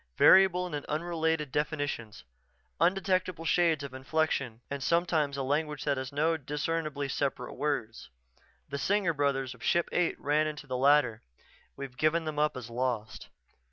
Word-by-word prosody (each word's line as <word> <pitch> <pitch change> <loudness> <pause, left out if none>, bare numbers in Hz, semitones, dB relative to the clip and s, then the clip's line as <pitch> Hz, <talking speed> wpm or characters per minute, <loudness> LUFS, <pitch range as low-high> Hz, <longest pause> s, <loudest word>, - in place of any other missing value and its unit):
"Variable 185 -1 +6
and 145 - -3
unrelated 160 -2 -1
definitions, 145 -7 -3 0.6
undetectable 185 -1 +1
shades 165 -3 +2
of 140 -2 -7
inflection 130 -3 -1
and 140 0 -5
sometimes 160 -3 +1
a 135 - -1
language 150 +2 -1
that 140 -2 0
has 130 -1 -4
no 160 +3 +1
discernibly 150 0 -2
separate 135 +1 -2
words. 120 - -3 0.6
The 140 0 -4
Singer 195 0 +1
brothers 140 -3 0
of - - -15
Ship 170 0 +2
Eight 175 -1 0
ran 150 +2 +1
into 150 -1 -6
the 130 -2 -4
latter. 130 -4 +3 0.5
We've 135 -2 -7
given 155 +4 +1
them 155 -1 -3
up 150 -3 +1
as 120 -2 -8
lost." 115 -3 -3
150 Hz, 150 wpm, -30 LUFS, 135-165 Hz, 0.6 s, Variable